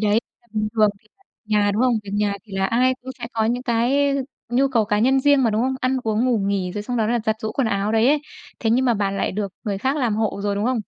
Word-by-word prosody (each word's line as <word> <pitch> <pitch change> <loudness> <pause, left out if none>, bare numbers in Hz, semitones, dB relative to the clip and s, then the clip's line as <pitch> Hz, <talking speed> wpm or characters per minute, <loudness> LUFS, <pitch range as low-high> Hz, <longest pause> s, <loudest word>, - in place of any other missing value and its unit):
đấy, 210 -1 +2 0.3
là 235 - -31
bình 215 0 0
thường 215 -2 +4
thì - - -30
không 390 - -33 0.2
nhà, 210 -1 +2
đúng 215 +5 +1
hông? 250 -2 +3
Việc 195 - -8
nhà 205 -1 +1
thì 210 - -16
là 195 - +1
ai 255 +4 +2
cũng 260 - -7
sẽ 235 - -5
có 225 -1 0
những 240 +3 0
cái 265 +4 +2 0.3
nhu 260 +3 +2
cầu 235 -5 +2
cá 210 0 0
nhân 265 +5 +3
riêng 285 0 +4
mà, 230 - +3
đúng 215 +1 0
hông? 260 +1 0
Ăn 255 +1 +1
uống, 220 +1 0
ngủ 250 -3 +2
nghỉ 195 -2 -1
rồi 205 +1 -4
xong 245 +3 -3
đó 220 - +1
là 240 +2 +1
giặt 220 0 +1
giũ 220 - -3
quần 270 - 0
áo 200 +1 0
đấy 225 +2 +4
ấy, 295 +1 +3 0.4
thế 225 - +1
nhưng 250 +3 +3
mà 245 -2 +3
bạn 200 -2 -1
lại - - -1
được 200 -1 -3
người 200 -2 -2
khác 265 +6 0
làm 245 -7 0
hộ 220 -2 -1
rồi, 205 0 0
đúng 205 +1 -1
hông? 250 -1 +1
225 Hz, 295 wpm, -22 LUFS, 210-255 Hz, 0.4 s, thường